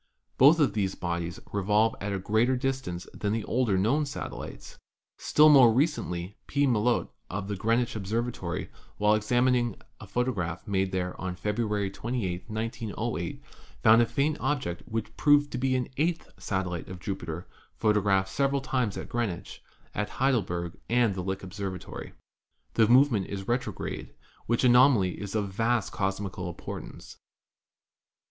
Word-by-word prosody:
Both 150 +6 +7
of 145 - +3
these 95 -3 -1
bodies 85 -1 -3
revolve 105 +3 +2
at 100 +1 -2
a 100 - -1
greater 110 +7 +2
distance 130 -9 -3
than 105 -1 -2
the 110 -1 -1
older 115 -5 +1
known 135 +10 +2
satellites. 140 - -7 0.4
Still 150 +1 +5
more 130 -6 +8
recently 105 - -1
P. 145 0 +2
Melotte 120 -1 +2 0.2
of 95 +1 -4
Greenwich 115 +3 +1
Observatory, 110 -3 -3 0.3
while 105 0 +4
examining 120 +1 +2 0.2
a - - -10
photograph 100 -8 -2
made 95 -2 0
there 90 -1 -2
on 90 -1 -3
February 105 +1 -1
28, 105 -4 -3
1908, 110 -1 -3 0.4
found 115 +1 +7
a 120 - +3
faint 145 +5 0
object 130 - -1
which 110 0 -4
proved 145 -1 +4
to 125 - -3
be 130 0 +1
an 125 -1 0
eighth 165 +3 -1
satellite 90 -4 -2
of 90 -1 -7
Jupiter, 85 -3 -5 0.3
photographed 100 -3 +2
several 140 +5 +1
times 125 -6 -1
at - - -5
Greenwich, 115 -8 -3 0.3
at 105 +1 -2
Heidelberg 90 -10 0
and 120 -4 +3
at 90 - -3
Lick 95 +1 -3
Observatory. 95 -1 -6 0.6
The 110 -2 +4
movement 120 -4 +4
is 95 -1 -6
retrograde, 120 -4 -3 0.3
which 115 +2 +1
anomaly 125 -7 +5
is 100 +1 -5
of 105 -2 0
vast 115 +1 0
cosmi 95 0 -2
cal 90 -1 -4
importance. 85 - -8
110 Hz, 145 wpm, -28 LUFS, 95-125 Hz, 0.6 s, more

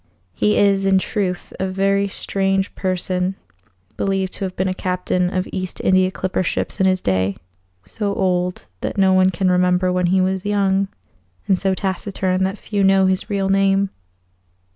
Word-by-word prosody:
He 210 - +1
is, 195 -1 +3
in 190 0 +4
truth, 190 -2 -2
a 190 - 0
very 195 +1 +1
strange 195 0 -1
person, 185 0 -1 0.6
believed 195 -1 -1
to 195 - -4
have 185 - -6
been 185 - 0
a 185 - 0
captain 180 -1 -1
of 185 0 -2
East 185 -1 -4
India 185 0 +4
clipper 185 0 -2
ships 180 - -2
in 190 - +4
his 185 -1 +1
day; 95 0 0 0.5
so 200 - -3
old 180 -1 -1
that - - -4
no 190 -1 +4
one 185 0 +4
can 185 0 0
remember 180 0 +2
when 180 -1 +1
he 190 +2 +3
was 190 0 0
young, 195 -1 +1 0.6
and 195 - +4
so 190 -1 +1
taciturn 190 -1 -1
that 195 +2 -3
few 205 -1 -2
know 195 0 +4
his 185 0 0
real 200 -2 0
name. 195 0 +2
190 Hz, 170 wpm, -20 LUFS, 185-195 Hz, 0.6 s, in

